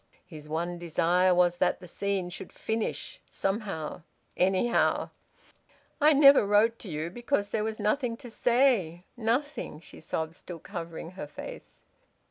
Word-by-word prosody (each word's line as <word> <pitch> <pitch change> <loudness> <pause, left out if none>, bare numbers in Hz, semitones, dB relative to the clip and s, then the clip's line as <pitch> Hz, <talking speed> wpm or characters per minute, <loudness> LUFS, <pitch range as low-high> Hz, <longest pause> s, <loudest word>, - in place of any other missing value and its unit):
His 155 -4 -11
one 170 +2 -2
desire 175 +2 +2
was 175 -1 +3
that 180 0 +1
the 180 - -11
scene 190 0 -2
should - - -8
finish, 220 0 -3
somehow, 195 -6 -3 0.3
anyhow. 190 +6 +2 0.9
"I 300 +1 +7
never 275 -2 +8
wrote 215 +3 +3
to 205 - -7
you 155 +1 -3
because 240 -1 -1
there 215 - 0
was 220 0 -3
nothing 230 +3 0
to 245 -3 -9
say. 235 -9 +2
Nothing!" 245 - -2
She - - -12
sobbed, 160 0 -3
still 175 +1 -9
covering 170 -1 -7
her 185 -5 -7
face. - - -10
190 Hz, 140 wpm, -28 LUFS, 170-230 Hz, 0.9 s, never